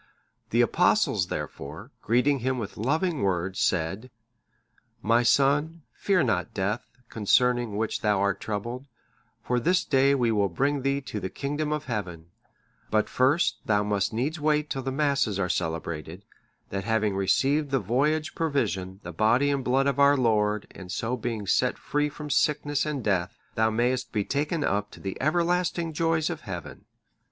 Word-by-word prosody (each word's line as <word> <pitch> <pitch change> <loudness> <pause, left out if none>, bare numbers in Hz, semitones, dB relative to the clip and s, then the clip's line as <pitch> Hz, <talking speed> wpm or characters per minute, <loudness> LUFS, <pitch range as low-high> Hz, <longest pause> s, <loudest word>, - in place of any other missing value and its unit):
The 120 - +3
Apostles 120 - +2
therefore, 70 -3 -6
greeting 125 +5 +2
him 130 +1 -1
with 105 -4 -5
loving 155 - 0
words, 95 -1 -1
said, 95 +8 0 0.9
"My 115 +2 +4
son, 145 +6 +2
fear 190 -4 +1
not 105 -8 -1
death, 105 +3 -2 0.2
concerning 120 0 +2
which 110 0 -1
thou 105 -3 +2
art 100 0 0
troubled; 120 +6 -4 0.6
for 125 0 0
this 180 +9 +2
day 140 0 +3
we 120 -4 +2
will 100 -2 +2
bring 140 +10 0
thee 140 +1 0
to 125 -5 -5
the 95 -1 -4
kingdom 145 +5 -3
of 150 0 -2
Heaven; 90 -8 -5 0.6
but 110 -1 +1
first 135 +6 +2
thou 105 -1 +3
must 105 -1 0
needs 135 +9 -2
wait 150 0 +1
till 135 - -2
the 135 +1 -3
Masses 140 -7 +1
are 95 -2 -1
celebrated, 80 +2 -3 0.4
that 95 0 -3
having 110 -2 0
received 135 +10 +2
thy 135 - +2
voyage 140 +8 0
provision,(628) 100 - -2
the 90 - -7
Body 115 - +3
and 140 -2 -1
Blood 130 +2 +2
of 140 -1 0
our 140 0 +6
Lord, 105 -4 +1
and 90 -2 -10
so 115 +6 -2
being 115 -3 -4
set - - +1
free 150 0 -1
from 150 0 -7
sickness 145 +3 +1
and 145 -4 -3
death, 95 -4 0 0.2
thou 110 0 +2
mayest 120 +3 0
be 105 -3 -1
taken 150 +3 -1
up 105 -5 0
to - - -13
the 95 -1 -5
everlasting 170 +2 +1
joys 165 0 +1
in - - -4
Heaven. - - -8
125 Hz, 165 wpm, -26 LUFS, 105-145 Hz, 0.9 s, our